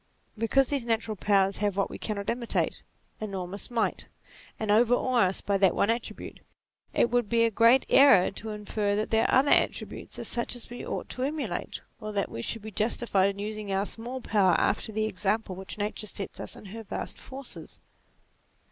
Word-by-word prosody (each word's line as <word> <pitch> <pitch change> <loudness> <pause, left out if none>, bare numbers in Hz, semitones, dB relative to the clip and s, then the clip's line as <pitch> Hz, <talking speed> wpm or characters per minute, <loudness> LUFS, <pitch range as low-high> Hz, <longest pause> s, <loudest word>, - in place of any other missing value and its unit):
Because 240 +4 +2
these 280 -4 0
natural 225 -2 -1
powers 195 -1 +2
have 205 -2 -1
what 195 - 0
we - - -7
cannot 200 -2 -3
imitate, 235 -1 -1 0.4
enormous 195 -2 -5
might, 235 -2 -1 0.5
and 215 -1 0
overawe 240 0 +4
us 185 - -2
by 200 -1 0
that 190 -2 +4
one 205 - +3
attribute, 230 0 -5 0.5
it 235 - +2
would 240 -4 +1
be 230 -1 +3
a 230 - +3
great 230 +5 +5
error 270 -11 +6
to 220 +2 -7
infer 210 -1 -1
that 215 +1 -2
their 225 0 +3
other 275 +2 +4
attributes - - 0
are - - -4
such 240 +1 0
as 240 - -6
we 245 - -7
ought - - -4
to 255 - -5
emulate, 270 - -3 0.2
or 215 0 -5
that 200 -2 -1
we 115 - -5
should 225 - -2
be 220 - -7
justified 210 -2 +1
in 200 - -5
using 210 0 -4
our 195 +1 +1
small 245 +5 -4
powers 195 -7 +3
after 215 - 0
the 215 0 0
example 200 0 -1
which 190 +3 -7
Nature 215 +1 -3
sets 195 -1 -3
us - - -7
with 200 - -11
her 225 +3 -7
vast 215 - -6
forces. 265 0 -9
215 Hz, 190 wpm, -28 LUFS, 200-235 Hz, 0.5 s, error